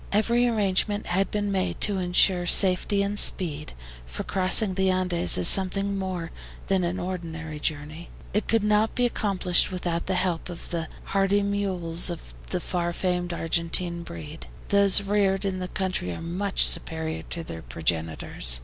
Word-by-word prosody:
Every 235 +4 +2
arrangement 205 -2 0
had 190 +3 0
been 205 -1 -2
made 190 -1 -2
to 205 -2 +2
insure 180 0 +3
safety 195 +2 +3
and 205 +1 0
speed, 155 -4 0 0.3
for - - -6
crossing 190 +2 +2
the 190 0 +1
Andes 180 - +2
is 90 - +5
something 195 +1 +4
more 185 -4 -4 0.3
than 190 -2 0
an 175 +2 -2
ordinary 165 -4 -6
journey. 155 +3 -5 0.2
It 210 - -1
could 225 -2 +1
not 210 +1 +1
be 245 - +2
accomplished 195 -6 +2
without 175 -2 -3
the 190 - 0
help 180 -2 -2
of 175 - -9
the 165 -2 -3 0.2
hardy 195 +1 +1
mules 185 -4 +1
of 170 -2 -8 0.2
the 180 - -1
far 175 -1 -3
famed 180 -1 -2
Argentine 170 +1 0
breed. 80 - -9 0.2
Those 200 0 +4
reared 200 -1 +1
in 190 -1 -2
the 180 - -4
country 185 - -3
are - - -7
much 185 +4 +1
superior 160 -1 0
to 170 - -5
their 80 - -8
progenitors. 80 -3 -1
185 Hz, 160 wpm, -25 LUFS, 165-195 Hz, 0.3 s, is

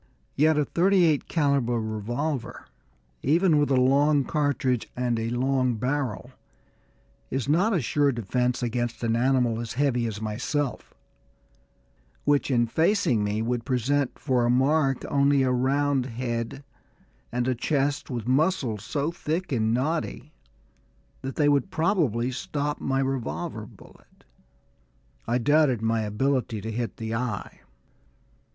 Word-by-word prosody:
Yet 155 +2 +3
a 150 - +2
thirty 185 +3 +3
eight 155 -4 +1
calibre 140 -7 +1
revolver, 120 +6 -3 0.6
even 160 +2 +3
with 145 - +1
a 135 - +3
long 140 +3 +3
cartridge 135 -5 0
and 125 -2 0
a 115 0 -2
long 130 0 +1
barrel, 125 0 -2 1.0
is 135 -1 -2
not 180 +10 +3
a 180 - +2
sure 145 +3 +2
defence 125 +2 -1
against 120 0 -2
an 115 0 +1
animal 125 -2 +2
as 115 -2 -5
heavy 125 -3 +1
as 105 -2 -5
myself, 125 +6 -3 1.3
which 145 -1 +2
in 120 -3 +3
facing 160 - +2
me 105 +2 -1
would 120 0 -1
present 130 +2 0
for 130 -4 0
a 120 - +2
mark 135 +2 +2
only 140 -1 +3
a 130 - +2
round 135 +1 +1
head 120 +2 -4 0.7
and 125 +1 -1
a 130 - +2
chest 140 +3 -1
with 120 -3 -4
muscles 130 - +1
so 145 +6 -2
thick 170 +1 -3
and 110 -4 +1
knotty 150 +3 -2 0.9
that 135 0 -5
they 150 - +2
would 145 +5 +2
probably 155 - +1
stop 145 +3 -3
any 135 0 0
revolver 135 -3 -3
bullet. - - -19 1.0
I 120 - +2
doubted 140 -2 +3
my 115 0 +1
ability 115 +2 -1
to 110 - -5
hit 115 -3 -4
the 110 0 -4
eye. 115 -3 -4
130 Hz, 135 wpm, -26 LUFS, 120-145 Hz, 1.3 s, Yet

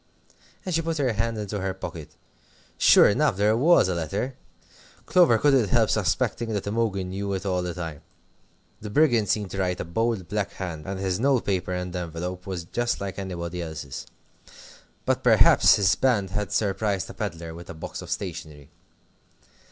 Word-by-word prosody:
And 185 - -3
she 165 - +2
put 165 0 -2
her 130 -5 +1
hand 115 +1 -1
into 105 -1 -4
her 95 -1 -2
pocket. 85 -4 -7 0.7
Sure - - +7
enough 120 0 +2
there 105 +2 +3
was 150 - +5
a 95 - 0
letter. 95 - -3 0.7
Clover 170 -11 +5
couldn't 135 -4 +3
help - - +3
suspecting 120 -1 0
that 100 - -2
Imogen 100 -3 -1
knew 100 +1 -3
it 95 +1 -4
all 90 -2 0
the 90 -1 -4
time. 80 -4 -6 0.8
The 105 - -7
Brigand 120 -5 +3
seemed 105 -2 0
to 95 - -4
write 90 -1 -1
a - - -3
bold, 105 +2 -1
black 105 -2 -2
hand, 85 -3 -6
and 95 0 -4
his 95 -1 -1
note 135 -1 +2
paper 95 -2 -1
and 90 0 -4
envelope 90 +1 -5
was 90 -3 -4
just 120 +8 -2
like 100 -1 -5
anybody 90 -2 -5
else's. 80 -5 -7 1.0
But - - +1
perhaps - - +6
his 100 -2 +3
band 105 -8 +1
had 105 -1 -3
surprised 100 -2 0
a - - -11
pedlar 80 0 -5
with 85 +1 -11
a 85 - -7
box 80 - -7
of - - -10
stationery. 80 -6 -6
95 Hz, 175 wpm, -25 LUFS, 90-110 Hz, 1.0 s, Sure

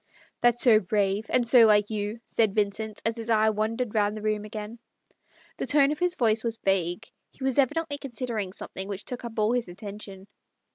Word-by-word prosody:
" - - -31
That's 240 0 +3
so 225 -4 +6
brave 200 +1 0
— - - -26
and 245 -2 +1
so 235 -1 +7
like 210 0 +3
you," 210 +2 -3
said 220 -4 +1
Vincent, 210 +1 -1
as 225 +1 -1
his 230 0 -6
eye 220 -1 +4
wandered 220 +2 -2
round 210 -1 +1
the 215 - -7
room 215 -1 -1
again. 215 +2 -7 0.8
The - - -3
tone 290 -1 +4
of 300 - -4
his 360 0 +1
voice 225 -5 +2
was 230 -1 -2
vague: 195 +1 0 0.2
he 270 - -12
was 265 +1 +1
evidently 285 +2 0
considering 235 -7 -4
something 190 0 -6
which 200 0 -6
took 250 -1 -5
up 230 -1 -8
all 215 +1 +2
his 245 -4 -1
attention. 195 +1 -9
220 Hz, 205 wpm, -26 LUFS, 205-240 Hz, 0.8 s, so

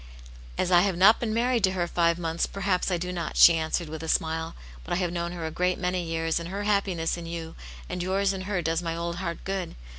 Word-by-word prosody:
"As 180 - 0
I 175 -1 +7
have 190 -2 0
not 200 +5 +6
been 230 -2 -2
married 235 0 +1
to 190 - -1
her 180 -2 0
five 170 -1 +2
months, 165 -1 -1
perhaps 195 -2 -1
I 180 - +1
do 180 +1 -4
not," 170 -2 -4
she 170 - +9
answered, 165 +1 -1
with 160 0 -7
a 160 - -6
smile. 160 0 -1
" - - -17
But - - -4
I - - +2
have 175 -1 -1
known 170 0 -2
her 170 -2 -5
a 160 - -3
great 180 +2 0
many 180 0 -1
years, 165 0 -1
and 170 0 -6
her 200 +2 -4
hap 205 -1 +2
piness 170 -2 -2
in 170 - -7
you 165 -1 -6 0.3
and 180 - -4
yours 195 +2 +1
in 190 - -5
her 185 -4 -1
does 165 +1 0
my 165 -1 -3
old 170 0 -3
heart 170 -2 -4
gooA. 190 -3 -3
175 Hz, 265 wpm, -27 LUFS, 165-190 Hz, 0.3 s, she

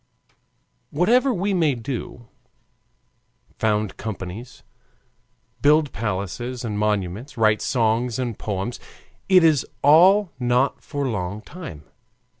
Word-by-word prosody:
Whatever 245 - +3
we 200 -2 -1
may 160 -7 +2
do 120 0 -6 1.3
found 105 -2 0
companies, 110 +3 -7 1.0
build 150 -1 +4
palaces 115 +5 -4
and 105 -2 -3
monuments, 105 +5 -2
write 110 -1 +3
songs 115 0 0
and 120 -4 -3
poems 105 +3 -4 0.5
it 185 -2 +6
is 155 -5 +4 0.2
all 180 +6 +6
not 125 +2 +1
for 145 -2 -3
long 100 -3 -3
time. 155 - -9
120 Hz, 100 wpm, -23 LUFS, 105-150 Hz, 1.3 s, it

